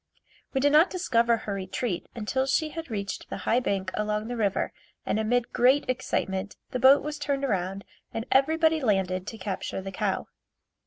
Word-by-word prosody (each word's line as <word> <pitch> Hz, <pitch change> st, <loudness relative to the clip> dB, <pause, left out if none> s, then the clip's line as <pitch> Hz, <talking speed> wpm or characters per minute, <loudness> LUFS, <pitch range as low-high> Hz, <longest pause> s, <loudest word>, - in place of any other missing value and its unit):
We 270 Hz, -, +1 dB
did 285 Hz, +1 st, +4 dB
not 315 Hz, +4 st, +6 dB
discover 235 Hz, -10 st, +2 dB
her 210 Hz, -2 st, -5 dB
retreat 190 Hz, 0 st, -3 dB
until 260 Hz, +4 st, -1 dB
she 310 Hz, +3 st, +1 dB
had 325 Hz, -1 st, -7 dB
reached 200 Hz, -3 st, -4 dB
the -, -, -4 dB
high 235 Hz, -, +3 dB
bank 195 Hz, -6 st, -1 dB
along 210 Hz, +1 st, -1 dB
the 245 Hz, -, -3 dB
river 205 Hz, -4 st, 0 dB, 0.3 s
and 215 Hz, -, 0 dB
amid 235 Hz, +2 st, 0 dB
great 260 Hz, +4 st, +4 dB
excitement 205 Hz, -6 st, -2 dB, 0.2 s
the 255 Hz, -, -2 dB
boat 270 Hz, +3 st, +7 dB
was 300 Hz, 0 st, -4 dB
turned 280 Hz, -1 st, -1 dB
around 195 Hz, -4 st, -2 dB, 0.3 s
and 225 Hz, -, -4 dB
everybody 315 Hz, +3 st, +3 dB
landed 190 Hz, -5 st, 0 dB
to 225 Hz, -, -6 dB
capture 190 Hz, -3 st, -4 dB
the 195 Hz, 0 st, -6 dB
cow. 185 Hz, -, -1 dB
230 Hz, 175 wpm, -27 LUFS, 195-275 Hz, 0.3 s, boat